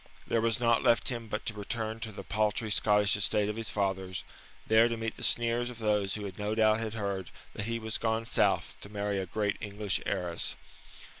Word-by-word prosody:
There 115 - +1
was 115 -1 +1
naught 115 -1 +3
left 115 - +3
him 120 -3 -4
but 105 0 -3
to 115 - -2
return 110 +2 -3
him - - -14
to 115 -1 -4
the 105 - -8
paltry 110 0 0
Scottish 105 -2 +4
estate 100 +1 +2
of 105 - -2
his 115 -1 -2
fathers, 95 -2 -1 0.4
there 110 +1 +6
to 115 -1 -2
meet 115 0 -3
the - - -12
sneers 120 +1 +1
of 125 - -9
those 105 -3 +1
who 100 -3 -5
no 105 +1 -1
doubt 110 0 +4
had 115 -1 -3
heard 100 -4 -2 0.2
that 100 - -4
he 115 0 -1
was 110 -1 -3
gone 115 0 0
South - - +2
to 100 - -9
marry 100 -1 -1
a 95 - -3
great 105 +2 0
English 105 -1 -2
heiress. 90 -3 -1
110 Hz, 215 wpm, -30 LUFS, 100-115 Hz, 0.4 s, there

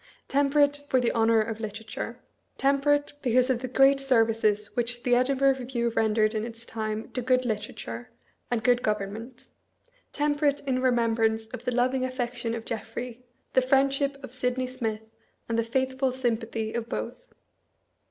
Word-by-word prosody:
Temperate, 285 +1 +3
for 260 - +4
the 245 - +1
honor 225 -1 +3
of 220 0 -3
Literature; 220 +2 -5 0.4
tem 275 0 +2
perate, 290 0 +2
because 255 +1 +3
of 245 - 0
the 255 - -3
great 270 +2 +5
services 225 -5 +2
which 240 0 -1
the 250 - 0
Edivhurgh 265 +2 +3
Review 240 -2 -1
rendered 220 -1 +2
in 215 -1 -1
its 230 0 -8
time 220 -1 -4
to 250 - -2
good 255 +1 +2
literature, 205 - -4 0.4
and 235 -2 -1
good 245 -1 +4
government; 215 +4 -3 0.7
temperate 290 -1 +1
ia 255 -1 +1
remembrance 225 -3 +2
of 240 - -8
the 250 - +1
loving 255 +2 +1
affec 255 -1 -2
tion 235 -1 -2
of 230 -1 -6
Jeffket, 230 +2 -5 0.3
the 260 - +5
friendship 275 +2 +2
of 260 - -9
Sydney 255 0 -1
Smith, 225 -4 -3 0.4
and 230 0 0
the - - +2
faithful 260 +2 0
sympathy 230 -3 -2
of 235 0 -3
both. - - -5
245 Hz, 160 wpm, -27 LUFS, 225-260 Hz, 0.7 s, great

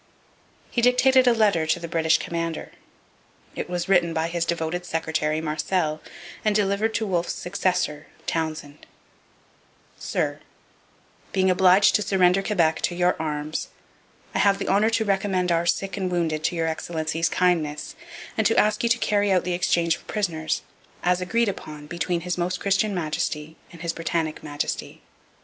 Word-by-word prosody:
He 240 - +1
dictated 255 +1 +5
a - - +7
letter 205 -8 +2
to - - +1
the 170 - -6
British 160 -1 +2
commander. 165 -1 -4 0.8
It - - -4
was 175 -1 -2
written 175 -3 +3
by 160 +1 0
his 170 -1 -1
devoted 170 +1 -2
secretary, 160 -2 -1
Marcel, 155 0 -1 0.4
and 215 -1 +2
delivered 205 +2 +1
to 220 - 0
Wolfe's 175 -3 -1
successor, 180 -4 -1 0.2
Townshend: 155 -3 -4 1.1
'Sir, - - -2 0.9
being 190 -1 +3
obliged 185 +2 +5
to - - +3
surrender 190 -1 +3
Quebec 170 -6 +1
to 175 - -1
your 180 +1 +2
arms 150 0 -3 0.7
I - - 0
have 200 -1 +4
the - - -3
honour 205 +3 +4
to 225 -1 +1
recommend 190 -2 +1
our 170 0 +1
sick 195 +3 0
and 190 -2 -1
wounded 160 -3 -1
to - - 0
Your 165 -1 0
Excellency's 160 0 -1
kindness, 160 -5 0 0.4
and - - +3
to - - +1
ask 210 +1 +3
you 235 - +1
to 230 - +3
carry 205 -3 +1
out 185 -2 +3
the 180 0 -2
exchange 170 -2 +1
of - - -21
prisoners, 170 -7 -2 0.4
as 180 0 +2
agreed 230 +6 +1
upon 150 -6 -6
between 170 +2 -2
His 180 +1 -3
Most 180 +1 -1
Christian 200 +1 +1
Majesty 155 -1 -2 0.2
and 170 -1 -11
His 170 -1 -1
Britannic 165 -1 -2
Majesty. 145 -1 -4
175 Hz, 160 wpm, -24 LUFS, 160-195 Hz, 1.1 s, a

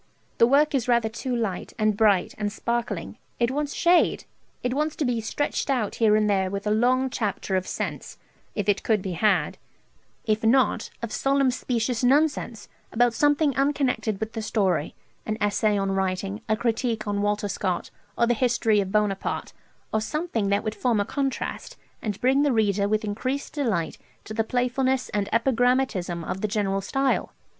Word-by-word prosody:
The 230 - +7
work 290 +4 +4
is 260 -4 0
rather 235 -2 +3
too 245 +3 -3
light, 215 -6 -3
and 215 -2 +2
bright, 205 -4 +3
and 205 -1 -1
sparkling; 235 +2 -3 0.2
it 235 +1 +2
wants 290 +1 -2
shade; 350 +1 +3 0.4
it 250 0 0
wants 300 +2 -1
to 300 - -1
be 240 -2 0
stretched 290 +6 -2
out 245 -6 0
here 215 -2 +5
and 215 0 +2
there 190 -2 +1
with 200 +1 -4
a 210 - +1
long 255 +4 +2
chapter 205 -4 -2
of 185 0 -1
sense, - - -5 0.4
if 205 -2 -2
it 200 -1 +2
could 215 -4 +1
be 190 - -3
had; 180 -3 +1 0.7
if 215 0 0
not, 235 +1 +3
of 230 - -3
solemn 275 -1 +2
specious 245 -1 -1
nonsense, 260 -5 +1 0.2
about 240 0 +3
something 290 +2 +2
unconnected 270 -7 0
with 220 +1 -4
the 225 - -3
story; 190 -8 0 0.3
an 215 0 -1
essay 205 0 +1
on 195 -1 0
writing, 195 +2 -2
a 215 - +2
critique 230 -1 -1
on 205 0 -1
Walter 205 0 0
Scott, 185 -2 -2 0.3
or 235 - +4
the 240 - +2
history 235 -3 +2
of 190 -1 -4
Buonaparte, 210 -2 -1 0.4
or 220 - +2
something 230 - -2
that 200 +1 +1
would 215 -1 -2
form 235 -2 +1
a 205 - +1
contrast, 275 - -3 0.2
and 210 -2 -3
bring 265 +3 +3
the 290 -1 +3
reader 205 -3 +2
with 215 +1 0
increased 255 +7 -3
delight 215 - -1 0.2
to 215 - -8
the 225 0 +1
playfulness 255 +2 0
and 205 -1 -1
epigrammatism 230 -7 +1
of 190 +3 -4
the 215 - +1
general 200 -2 0
style 270 +7 0
225 Hz, 180 wpm, -25 LUFS, 205-255 Hz, 0.7 s, The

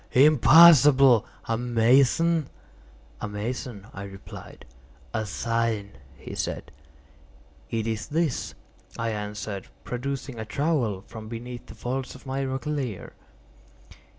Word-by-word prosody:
Impossible! 140 -3 +7 0.2
A 115 0 -1
mason?" 130 +7 +3 0.7
"A - - -2
mason," 105 0 -5
I 95 - -7
replied. 95 0 -11 0.5
"A 110 -1 -2
sign," 115 0 -1 0.3
he - - -9
said. - - -4 1.0
"It 115 -1 -2
is 110 -1 -3
this," 155 -3 -1 0.4
I 115 0 -1
answered, 105 -2 -5 0.2
producing 130 0 -5
a 110 - -4
trowel 120 - -1
from 110 -1 -10
beneath 120 +1 -7
the - - -11
folds 130 +2 -4
of 130 - -14
my 135 +1 -2
roquelaire. 135 - -4
120 Hz, 110 wpm, -26 LUFS, 110-135 Hz, 1.0 s, Impossible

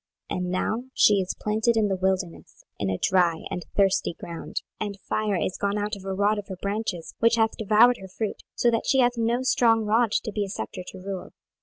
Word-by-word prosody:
26:019:013 - - -1
And 180 - -2
now 215 +6 -1
she 210 - +6
is 185 - -3
planted 220 +2 +1
in 215 -1 +3
the 195 - 0
wilderness, 185 -2 -2 0.2
in 100 - -1
a 95 - -1
dry 175 -3 +2
and 175 - -3
thirsty 195 -3 +2
ground. 170 -1 -5 0.2
26:019:014 215 - 0
And 200 -1 -8
fire 215 -2 -1
is 185 +1 -2
gone 200 +1 0
out 210 +1 -2
of 195 -1 -11
a 195 - -2
rod 205 +2 +2
of 205 - -8
her 190 -3 -6
branches, 200 -4 -3
which 230 +1 +4
hath 225 -1 +2
devoured 220 +3 +5
her 190 - -9
fruit, 205 +3 -4
so 240 - +3
that 230 - -1
she 270 - +3
hath 245 0 +3
no 235 +2 0
strong 225 -3 +3
rod 225 +1 +3
to 220 - 0
be 205 0 -1
a 195 - -5
sceptre 145 - -5
to - - -8
rule. 190 0 -6
205 Hz, 230 wpm, -25 LUFS, 190-225 Hz, 0.2 s, she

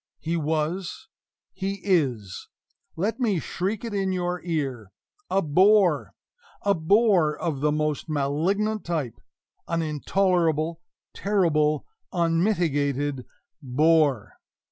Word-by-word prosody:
he 165 +2 -3
was 160 +3 -2 0.4
he 195 +1 -4
is 130 - 0 0.5
let 215 +8 -2
me 215 -8 +1
shriek 195 +8 -3
it 230 - -5
in 195 -1 0
your 180 -1 -2
ear 135 - -3 0.4
a 195 - +1
bore 185 +1 +3 0.5
a 200 - +3
BORE! 180 -2 +3
of 160 -6 -2
the 150 +2 +2
most 150 +1 -1
malignant 175 +10 0
type; 155 -9 -3 0.5
an 165 -1 -1
intolerable, 165 0 0 0.3
terrible, 155 -7 +1 0.3
unmitigated 160 - 0 0.3
BORE! 145 -4 +2
165 Hz, 100 wpm, -25 LUFS, 150-190 Hz, 0.5 s, bore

